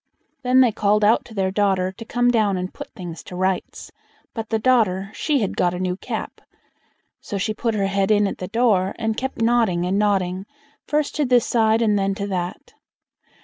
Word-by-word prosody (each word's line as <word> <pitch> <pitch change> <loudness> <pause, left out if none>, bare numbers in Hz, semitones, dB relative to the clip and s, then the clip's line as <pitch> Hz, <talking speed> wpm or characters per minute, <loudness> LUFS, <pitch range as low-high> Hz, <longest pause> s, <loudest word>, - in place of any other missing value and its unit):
Then 255 0 +4
they 245 -3 +4
called 210 0 +1
out 220 +3 +3
to 225 - -13
their 190 -1 0
daughter 190 -2 +1
to 225 +4 -11
come 245 +2 +2
down 210 -5 +2
and 185 +1 -4
put - - -9
things 170 -3 -7
to 180 - -9
rights; 185 0 -2 0.4
but 225 -2 -5
the 225 - +1
daughter, 215 -5 +2
she 290 +1 0
had 200 - -2
got 175 0 +1
a - - -5
new 185 -1 -1
cap; - - -6 0.8
so 205 - -5
she 215 +3 -1
put 225 0 -2
her 200 -2 +1
head 195 0 0
in 210 -1 +4
at 195 - -3
the 185 - -4
door, 205 -4 +1
and 225 -1 -1
kept 265 -1 -3
nodding 225 -7 +2
and 190 +3 0
nodding, 190 -2 0 0.4
first 300 -1 0
to 295 - +2
this 245 -2 +3
side, 225 -1 +2
and 210 -2 +2
then 195 0 0
to 200 - -3
that. 180 -2 -4
205 Hz, 205 wpm, -22 LUFS, 190-230 Hz, 0.8 s, Then